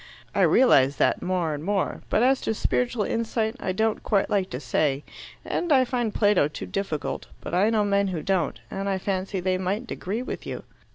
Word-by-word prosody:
"I - - +1
realize 140 - +5
that - - +2
more 180 -3 0
and 145 0 -5
more. 195 +1 -1
But 220 - +3
as 265 +1 +3
to 220 - -1
spiritual 240 0 0
insight, 225 +1 -1
I - - -2
don't 220 +3 0
quite 200 -2 +1
like 195 -2 +1
to 125 - -5
say; 140 +2 0 0.4
and 345 - -2
I 260 -2 +5
find 240 -3 -1
Plato 205 -8 +3
too 150 - -7
difficult, 190 -7 -3
but - - -8
I 190 +5 +4
know 215 -2 +2
men 200 0 +2
who 175 -5 -3
don't, 180 - 0
and 195 +1 -3
I 195 - 0
fancy 190 0 -2
they 185 0 0
mightn't 200 +6 -2
agree 215 +7 -3
with - - -5
you." - - -5
195 Hz, 205 wpm, -25 LUFS, 180-220 Hz, 0.4 s, realize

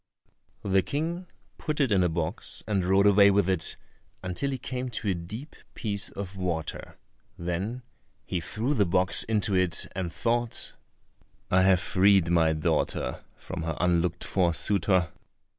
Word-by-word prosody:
The 95 -1 +3
King 165 - -3 0.3
put 155 -1 -3
it 135 -5 +2
in 95 -2 +4
a 90 - +2
box 80 +4 -2
and 100 -4 0
rode 95 +2 +3
away 100 0 +7
with 100 -2 +3
it 95 -4 0 0.5
until 90 +10 -2
he 135 - -2
came 125 +1 -4
to 110 -3 -3
a - - +3
deep 105 - -7 0.2
piece 100 -3 -2
of 100 -1 -7
water; 85 -4 -4 0.4
then 95 +9 -3 0.4
he 90 - -2
threw 110 - -2
the 105 -9 +2
box 90 0 +2
into 105 -2 0
it 90 -2 +1
and 90 -3 -3
thought, 120 +2 -2 0.8
"I 90 - +5
have 95 -1 +5
freed 95 -2 +3
my 80 -2 +4
daughter 75 -4 -1
from 95 -3 -7
her 80 0 -3
unlooked 85 -1 +1
for 90 -4 +1
suitor." 95 -3 +1
95 Hz, 155 wpm, -27 LUFS, 85-110 Hz, 0.8 s, away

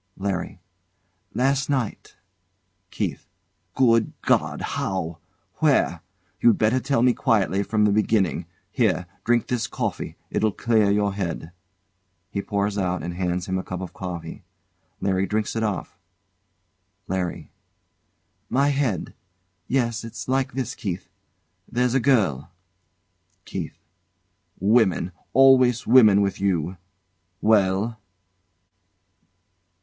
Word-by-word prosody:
LARRY. 95 -1 -3 0.8
Last 135 +2 +1
night. 130 -6 -2 0.7
KEITH. - - -4 0.5
Good 115 -4 +3
God! - - +1
How? 85 -4 -3 0.4
Where? - - +2 0.4
You'd 115 -3 +5
better 110 +4 +2
tell 130 -2 +1
me 125 -1 +5
quietly 100 -6 +1
from 105 +1 +1
the 105 - +3
beginning. 100 -5 +1 0.2
Here, 100 -8 +1 0.2
drink 120 -1 +2
this 125 -2 -1
coffee; - - -4 0.2
it'll 110 -2 +1
clear 110 -4 +2
your 100 0 +1
head. 90 -4 -4 0.8
He 100 - -2
pours 100 0 -1
out 90 -3 -1
and 85 +1 -4
hands 90 -1 -2
him 95 0 -1
a - - -4
cup 90 - -5
of 95 -2 -7
coffee. 85 -3 -6 0.6
LARRY 95 0 +1
drinks 105 +3 -1
it 115 - 0
off. 105 -5 -3 1.1
LARRY. 90 -2 -3 1.0
My 140 +3 +3
head! 135 - -1 0.5
Yes! 120 -3 0
It's 115 - -7
like 130 -1 0
this, 130 -1 -3
Keith 95 -2 -5 0.6
there's 125 0 +1
a 135 - +3
girl 105 - +2 1.0
KEITH. 85 -5 -5 0.8
Women! 100 -3 +3 0.2
Always 130 -3 +5
women, 110 -5 +7
with 100 -1 -1
you! 90 -2 0 0.6
Well? 105 +1 +2
105 Hz, 115 wpm, -24 LUFS, 95-120 Hz, 1.1 s, women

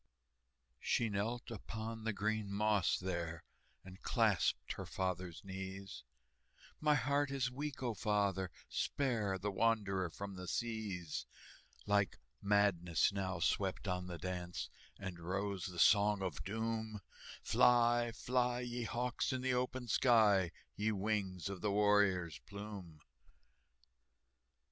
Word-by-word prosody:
She 115 - +1
knelt 115 +5 -2
upon 110 +1 -5
the 115 - +2
green 105 0 -1
moss 105 -2 +2
there, 85 -3 -3 0.4
And 95 0 -11
clasped - - +2
her - - -6
father's 90 -2 -3
knees: 95 -6 -6 0.8
"My 150 -1 +4
heart 140 +2 +2
is 135 -2 0
weak, 140 +1 -4
O 120 -2 0
father, 100 -2 +1 0.2
spare 115 -9 0
The 100 +2 -2
wanderer 100 -4 +1
from 100 +4 -6
the 90 0 -6
seas!" 105 -9 -3 0.6
Like 100 -2 +2 0.2
madness 100 -4 +3
now 95 -3 -2
swept 95 +2 0
on 90 -1 -1
the 85 -1 -5
dance, 90 0 -4 0.3
And 95 -3 -6
rose 95 +1 -2
the 90 -2 -8
Song 100 +3 +5
of 95 - -3
Doom, 110 0 -2 0.4
"Fly, 120 -1 +4
fly, 125 +1 0
ye 120 -1 -3
hawks, 125 +5 -1
in 130 -1 -1
the 130 0 +1
open 125 0 -1
sky, 105 -6 +5 0.3
Ye 110 +1 +1
wings 100 -3 -1
of 100 -2 -5
the 105 - +1
warrior's 100 -5 +3
plume!" 100 -6 -8
100 Hz, 125 wpm, -36 LUFS, 95-115 Hz, 0.8 s, Song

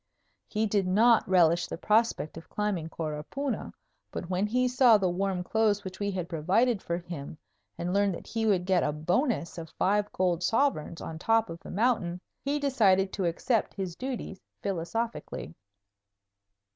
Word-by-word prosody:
He 215 0 0
did 205 -3 +1
not 220 +3 +4
relish 175 -2 +4
the - - -5
prospect 215 -4 +1
of 165 - -11
climbing 200 -6 -2
Coropuna, 165 - -4 0.4
but 175 - -6
when 185 +3 +1
he 250 +3 +2
saw 250 -3 +6
the 195 -2 +1
warm 185 0 -1
clothes 210 0 +1
which 190 0 -8
we 200 0 -1
had 185 -3 -3
provided 195 +8 +1
for 170 - -2
him 170 -4 -7 0.4
and 175 +1 -2
learned 200 -2 +2
that - - -10
he 225 -1 -1
would 185 -4 +2
get 185 -2 +3
a 150 - +1
bonus 175 - -1
of 165 -1 -8
five 205 +2 +1
gold 180 -2 0
sovereigns 200 - 0
on 160 -1 -6
top 225 0 +2
of 165 - -7
the - - -11
mountain, 200 -6 +1 0.2
he 280 +1 0
decided 205 -10 +3
to 195 - -1
accept 205 +7 0
his 185 -4 -4
duties 245 -5 -5 0.2
philosophically. 195 - -3
195 Hz, 165 wpm, -28 LUFS, 175-225 Hz, 0.4 s, saw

